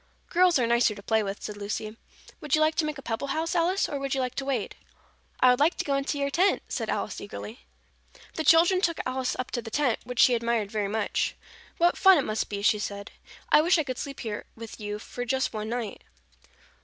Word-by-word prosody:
"Girls 360 Hz, -1 st, +4 dB
are 245 Hz, -, +2 dB
nicer 235 Hz, -2 st, +3 dB
to 200 Hz, -, -11 dB
play 220 Hz, +1 st, +2 dB
with," 200 Hz, -1 st, -5 dB
said 210 Hz, -, -6 dB
Lucy. 215 Hz, +1 st, -4 dB, 0.4 s
"Would 300 Hz, -1 st, +1 dB
you 310 Hz, -, +1 dB
like 310 Hz, +1 st, +3 dB
to 310 Hz, -, 0 dB
make 305 Hz, 0 st, -3 dB
a 275 Hz, -, -10 dB
pebble 230 Hz, +4 st, -3 dB
house, 320 Hz, +4 st, -1 dB
Alice, 360 Hz, +3 st, +1 dB
or 285 Hz, -, -4 dB
would 275 Hz, 0 st, -2 dB
you -, -, -1 dB
like 255 Hz, -1 st, -1 dB
to 270 Hz, -, -4 dB
wade?" 260 Hz, -6 st, -2 dB, 0.6 s
"I 255 Hz, -, +6 dB
would 250 Hz, -, +1 dB
like 310 Hz, +5 st, +3 dB
to -, -, -2 dB
go 280 Hz, -, 0 dB
into 275 Hz, +1 st, -1 dB
your 280 Hz, 0 st, -1 dB
tent," 365 Hz, +7 st, +2 dB
said -, -, -3 dB
Alice -, -, -3 dB
eagerly. 215 Hz, +4 st, -9 dB, 0.7 s
The 320 Hz, -, -3 dB
children 340 Hz, +4 st, +5 dB
took 335 Hz, -3 st, 0 dB
Alice 255 Hz, 0 st, -1 dB
up 255 Hz, -, -4 dB
to 240 Hz, -, -2 dB
the 225 Hz, -, -8 dB
tent, 255 Hz, -1 st, +1 dB
which 250 Hz, +1 st, -7 dB
she 250 Hz, -, +6 dB
admired 230 Hz, -3 st, 0 dB
very 210 Hz, -2 st, -1 dB
much. 215 Hz, +1 st, -1 dB, 0.4 s
"What 345 Hz, +1 st, +2 dB
fun 385 Hz, -2 st, +7 dB
it 285 Hz, -, 0 dB
must 215 Hz, 0 st, -2 dB
be!" 200 Hz, -1 st, -4 dB
she 210 Hz, 0 st, +3 dB
said. 200 Hz, 0 st, -5 dB, 0.4 s
"I -, -, +6 dB
wish 345 Hz, +3 st, +4 dB
I 315 Hz, -, +1 dB
could 255 Hz, -3 st, -5 dB
sleep 275 Hz, -1 st, -6 dB
here 215 Hz, -3 st, -5 dB
with 225 Hz, 0 st, -10 dB
you 210 Hz, 0 st, -4 dB, 0.3 s
just 265 Hz, +1 st, 0 dB
one 215 Hz, 0 st, -4 dB
night." 235 Hz, -3 st, -4 dB
255 Hz, 230 wpm, -27 LUFS, 220-305 Hz, 0.7 s, fun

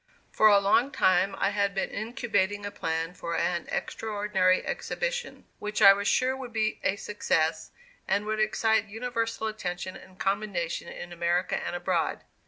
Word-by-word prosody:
For 215 Hz, -, +5 dB
a 205 Hz, -1 st, +7 dB
long 200 Hz, +6 st, +3 dB
time 195 Hz, -6 st, +3 dB
I 195 Hz, -, +2 dB
had 200 Hz, -1 st, 0 dB
been 195 Hz, -, -1 dB
incubating 205 Hz, -3 st, -1 dB
a 205 Hz, -, -4 dB
plan 165 Hz, -1 st, -2 dB
for 170 Hz, -1 st, -4 dB
an 175 Hz, -1 st, -1 dB
extraordinary 205 Hz, -4 st, 0 dB
exhibition 485 Hz, 0 st, -3 dB
which 210 Hz, 0 st, -3 dB
I 200 Hz, -2 st, +10 dB
was 200 Hz, +1 st, -2 dB
sure 255 Hz, +1 st, +2 dB
would 260 Hz, -2 st, -7 dB
be 220 Hz, -1 st, -1 dB
a 190 Hz, -, +2 dB
success 160 Hz, -6 st, -1 dB, 0.4 s
and 205 Hz, -, +1 dB
would 215 Hz, 0 st, -2 dB
excite 220 Hz, 0 st, +2 dB
universal 230 Hz, +1 st, -3 dB
attention 185 Hz, -4 st, -4 dB
and 185 Hz, 0 st, -14 dB
commendation 195 Hz, -4 st, -2 dB
in 175 Hz, 0 st, -8 dB
America 175 Hz, +1 st, 0 dB
and -, -, -3 dB
abroad. 175 Hz, -1 st, -1 dB
200 Hz, 160 wpm, -28 LUFS, 180-220 Hz, 0.4 s, I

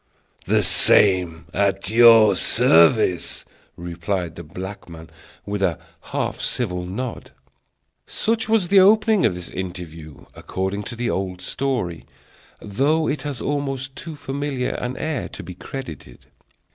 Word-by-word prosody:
"The -, -, +3 dB
same, 90 Hz, -5 st, +3 dB
at 100 Hz, 0 st, 0 dB
your 115 Hz, -3 st, +7 dB
service!" 90 Hz, +2 st, +3 dB, 0.3 s
replied 85 Hz, 0 st, -4 dB
the 85 Hz, -, -8 dB
black 95 Hz, +4 st, -8 dB
man, 80 Hz, -1 st, -11 dB, 0.3 s
with 100 Hz, -1 st, -3 dB
a 90 Hz, -5 st, +1 dB, 0.3 s
half -, -, -3 dB
civil 90 Hz, -7 st, -2 dB
nod. 115 Hz, +6 st, -5 dB, 0.8 s
Such 225 Hz, 0 st, -1 dB
was 215 Hz, -6 st, +2 dB
the 195 Hz, -, +6 dB
opening 215 Hz, +1 st, +5 dB
of 90 Hz, -, -3 dB
this 90 Hz, -1 st, -8 dB
interview, 85 Hz, -5 st, -8 dB
according 95 Hz, +2 st, -4 dB
to 120 Hz, -, -6 dB
the 120 Hz, 0 st, -2 dB
old 95 Hz, -1 st, -3 dB
story; 120 Hz, -10 st, -3 dB, 0.5 s
though 145 Hz, +10 st, 0 dB
it 145 Hz, -1 st, -2 dB
has 145 Hz, -3 st, -5 dB
almost 135 Hz, -2 st, -3 dB
too 160 Hz, +1 st, -7 dB
familiar 140 Hz, -2 st, -3 dB
an 125 Hz, +1 st, -4 dB
air 155 Hz, -5 st, -3 dB
to -, -, -9 dB
be 90 Hz, +2 st, -8 dB
credited. 85 Hz, -, -9 dB
100 Hz, 135 wpm, -22 LUFS, 90-135 Hz, 0.8 s, your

